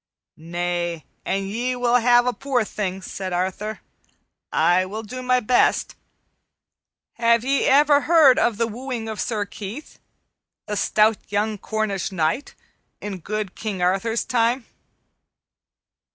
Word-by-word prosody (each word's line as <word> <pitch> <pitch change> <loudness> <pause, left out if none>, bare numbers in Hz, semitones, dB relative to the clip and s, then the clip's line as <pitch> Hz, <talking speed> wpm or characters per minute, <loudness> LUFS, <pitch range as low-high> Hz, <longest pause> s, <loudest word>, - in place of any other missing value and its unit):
"Nay, 175 0 -3 0.2
an 195 0 -1
ye 240 +6 -2
will 245 0 +3
ha' 240 +1 +5
a 250 - +1
poor 270 -3 0
thing," 195 -3 -4
said 190 -1 -5
Arthur, 190 +4 -3 0.7
"I 175 +3 +3
will 210 +4 -6
do 255 +4 -7
my 255 0 +2
best. 245 +1 +2 1.3
Have 235 0 +3
ye 275 +1 +2
ever 290 +1 +5
heard 310 -5 +6
of 235 -3 +1
the 230 - +1
wooing 235 0 -5
of 220 -1 -4
Sir 215 -3 -1
Keith, 210 +8 -9 0.7
the 210 - -3
stout 215 +1 +3
young 210 +1 0
Cornish 210 -3 -2
knight, 170 - -1 0.4
in 200 -2 -6
good 210 +2 -4
King 200 -5 -4
Arthur's 195 +6 0
time?" 235 +1 +1
220 Hz, 130 wpm, -23 LUFS, 195-245 Hz, 1.3 s, heard